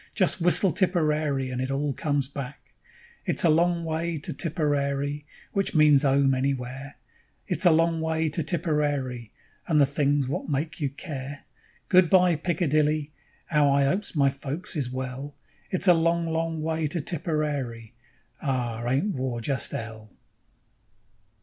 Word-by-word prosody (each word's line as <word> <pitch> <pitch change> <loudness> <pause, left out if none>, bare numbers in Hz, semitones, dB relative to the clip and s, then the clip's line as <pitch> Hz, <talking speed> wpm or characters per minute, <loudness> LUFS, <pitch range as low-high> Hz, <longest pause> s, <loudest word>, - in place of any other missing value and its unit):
Just 185 -2 +2
whistle 175 +2 +4
Tipperary 155 - 0
and 125 0 -3
it 130 - -2
all 140 +1 -1
comes 145 -2 -1
back: 140 0 -8 0.5
_It's - - +3
a 165 - +5
long 170 +1 +2
way 165 +1 -2
to 145 - -4
Tipperary 145 -2 -1 0.3
(Which 195 -3 0
means 150 -2 +6
"'ome" 135 -1 +3
anywhere); 135 +1 -3 0.5
It's - - +1
a - - +7
long 165 0 +2
way 160 0 0
to 155 +2 -1
Tipperary 145 - -1 0.4
(And 155 -3 +3
the 140 - +6
things 140 -1 +1
wot 140 +4 -3
make 155 +4 -2
you 140 - +1
care). 140 -1 -7 0.4
Good 185 -3 +5
bye, 180 -3 +5
Piccadilly 155 -2 0 0.4
('Ow 150 -2 +4
I 140 0 +3
'opes 185 +6 -1
my 140 -2 +3
folks 140 +7 -6
is 140 -5 -1
well); 130 +2 -5 0.3
It's 185 +1 +1
a 180 - +8
long, 170 0 +1
long 165 -1 -2
way 160 -1 -1
to 160 +4 -2
Tipperary 145 -8 -3 0.5
('R! 120 -5 -2
Ain't 140 +12 +1
War 130 -3 -3
just 130 +2 -2
'ell?) 110 -1 -7
145 Hz, 150 wpm, -26 LUFS, 135-165 Hz, 0.5 s, a